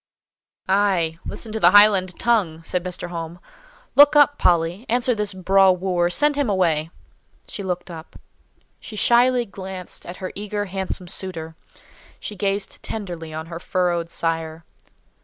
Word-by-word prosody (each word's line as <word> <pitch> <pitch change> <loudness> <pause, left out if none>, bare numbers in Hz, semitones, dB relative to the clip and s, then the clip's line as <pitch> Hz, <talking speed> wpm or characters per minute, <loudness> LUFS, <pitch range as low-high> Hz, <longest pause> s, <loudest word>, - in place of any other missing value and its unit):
"Ay! 190 -5 +1
Listen 225 - -6
to 220 - -3
the 175 - +6
Highland 195 -2 +5
tongue!" 190 -9 +1
said 180 +2 -2
Mr. 180 -1 -5
Home. 170 0 -6 0.5
"Look 290 +1 +7
up, 290 0 +5
Polly! 175 +3 +2
Answer 245 +2 +2
this 210 -3 -1
'braw 190 +1 +3
wooer;' 180 -1 0
send 295 +10 +3
him 285 -5 0
away!" 165 -5 +1 0.6
She - - -6
looked 180 -1 -4
up. 160 0 -11 0.6
She 215 - -10
shyly 240 +3 +3
glanced 190 -3 -8
at 175 - -8
her 185 - -6
eager, 205 0 -4
handsome 190 -1 -5
suitor. 170 -3 -6 0.6
She 210 - -7
gazed 195 +1 -2
tenderly 175 -7 -5
on 160 +1 -6
her 165 0 -8
furrowed 175 -2 -1
sire. 165 -1 -3
185 Hz, 145 wpm, -22 LUFS, 170-205 Hz, 0.6 s, Look